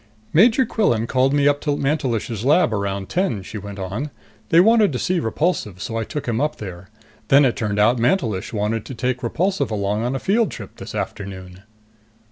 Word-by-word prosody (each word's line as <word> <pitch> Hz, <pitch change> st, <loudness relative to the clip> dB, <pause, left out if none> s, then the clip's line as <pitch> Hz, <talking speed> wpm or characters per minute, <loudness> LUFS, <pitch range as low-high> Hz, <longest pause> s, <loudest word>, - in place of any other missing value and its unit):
"Major 230 Hz, -, +5 dB
Quillan 120 Hz, -, +1 dB
called 130 Hz, +2 st, +2 dB
me 145 Hz, 0 st, +3 dB
up 145 Hz, 0 st, +2 dB
to 145 Hz, -2 st, 0 dB
Mantelish's 120 Hz, -7 st, -1 dB
lab 140 Hz, -3 st, +3 dB
around 100 Hz, -2 st, -2 dB
ten," 150 Hz, -, -1 dB
she 105 Hz, +3 st, -7 dB
went 100 Hz, 0 st, -8 dB
on. 100 Hz, +10 st, -4 dB, 0.4 s
"They 165 Hz, -, +5 dB
wanted 215 Hz, +1 st, +5 dB
to -, -, -1 dB
see 180 Hz, +7 st, 0 dB
Repulsive, 115 Hz, -, -1 dB
so 110 Hz, +3 st, -5 dB
I 115 Hz, -1 st, -1 dB
took 145 Hz, +3 st, -5 dB
him 115 Hz, +1 st, 0 dB
up 150 Hz, +1 st, 0 dB
there. 95 Hz, -2 st, -9 dB, 0.4 s
Then 140 Hz, +3 st, +6 dB
it 125 Hz, -, +1 dB
turned 105 Hz, -2 st, -2 dB
out 115 Hz, +4 st, +3 dB
Mantelish 115 Hz, -, 0 dB
wanted 105 Hz, 0 st, -1 dB
to 130 Hz, -, -7 dB
take 125 Hz, +1 st, -2 dB
Repulsive 155 Hz, +4 st, 0 dB
along 105 Hz, 0 st, -1 dB
on 125 Hz, +3 st, -1 dB
a -, -, -2 dB
field 215 Hz, -, +1 dB
trip -, -, -9 dB
this -, -, -8 dB
afternoon." 95 Hz, -2 st, -6 dB
120 Hz, 195 wpm, -21 LUFS, 105-150 Hz, 0.4 s, Then